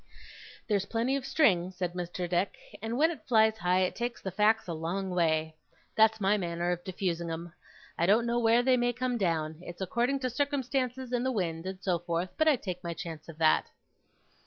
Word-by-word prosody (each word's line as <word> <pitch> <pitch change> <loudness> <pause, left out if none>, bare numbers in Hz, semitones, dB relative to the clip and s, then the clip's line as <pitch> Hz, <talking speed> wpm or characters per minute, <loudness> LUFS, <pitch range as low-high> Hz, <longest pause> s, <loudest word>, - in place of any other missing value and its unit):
'There's 200 -3 0
plenty 235 +4 0
of 270 -1 -3
string,' 185 - +3
said 180 -1 -3
Mr. 180 0 -4
Dick, 175 +2 0 0.2
'and 225 +2 -3
when 320 +4 +4
it 330 - -10
flies 220 -2 +4
high, 180 0 +2
it 185 - 0
takes 240 0 -3
the 190 - -5
facts 215 +3 +2
a 170 - -3
long 180 +4 -3
way. 160 -3 +1 0.4
That's 220 0 +4
my 205 +1 +3
manner 175 -1 -1
of 175 0 -3
diffusing 175 -3 -2
'em. 165 +1 -6 0.5
I 170 - +3
don't 220 +4 +4
know 240 0 +1
where 230 +1 +4
they 255 0 +4
may 245 0 +1
come 250 0 -1
down. 160 -4 -1
It's 175 -1 -9
according 240 +8 0
to 255 - 0
circumstances, 260 -2 -1
and 245 0 +1
the 260 - +1
wind, 175 -6 -2
and 190 0 -6
so 180 -3 +1
forth; 175 +1 -2
but 315 - +2
I 305 - +6
take 185 -6 -6
my 170 -1 -4
chance 160 -1 -7
of 160 - -10
that. 160 -1 +3
190 Hz, 205 wpm, -30 LUFS, 175-240 Hz, 0.5 s, I